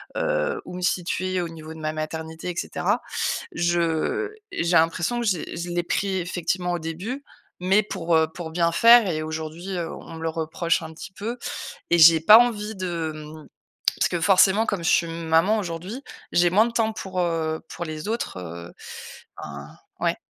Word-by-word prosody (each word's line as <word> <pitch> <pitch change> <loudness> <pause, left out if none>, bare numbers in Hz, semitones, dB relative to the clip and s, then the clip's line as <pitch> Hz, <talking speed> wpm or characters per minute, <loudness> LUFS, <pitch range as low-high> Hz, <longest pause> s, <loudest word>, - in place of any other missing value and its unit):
heu - - -1
heu, - - 0
où - - -8
me 180 - -6
situer 185 +1 0
au 175 - -2
niveau 160 -1 -9
de 160 - -11
ma 155 0 -2
maternité 160 +2 -5
et 175 - -4
cetera. - - -1 0.5
Je 170 - 0 0.2
j'ai 170 +1 +1
l'impression 170 +8 +1
que - - -2
j'ai 180 -6 -1
je 170 +1 -4
l'ai 175 0 -1
pris, 190 +2 -1
effectivement, 180 0 -2
au 175 - -1
début, 180 - -5 0.4
mais 190 +4 +4
pour, 175 -5 -1
heu, 160 0 +4
pour 165 -3 -6
bien 170 0 +2
faire 230 +4 +7
et 155 -2 -1
aujourd'hui, 160 +4 -5
heu, 170 -1 -3
on - - -10
me 160 - -7
le 165 - 0
reproche 165 +1 -1
un 160 0 -8
petit 185 +4 -9
peu 225 +6 -4 0.5
et 170 - +4
j'ai 160 0 +8
pas 210 +6 +9
envie 220 -3 +1
de, 170 -4 -3
mmh, 155 0 -10 0.5
parce - - +3
que, 175 - -2
forcément, 195 +4 +5
comme 195 -4 -1
je 165 - +2
suis 170 - +3
maman 165 +5 +2
aujourd'hui, 185 +7 -5 0.3
j'ai 175 0 +4
moins 210 +5 +5
de - - -5
temps 225 -1 +1
pour, 190 -3 -5
heu, 160 -2 -1
pour - - -5
les 155 +1 -6
autres, 225 - -3
heu, 85 -1 -8 0.7
enfin 70 0 -8 0.3
ouais? - - +1
170 Hz, 190 wpm, -24 LUFS, 160-195 Hz, 0.7 s, pas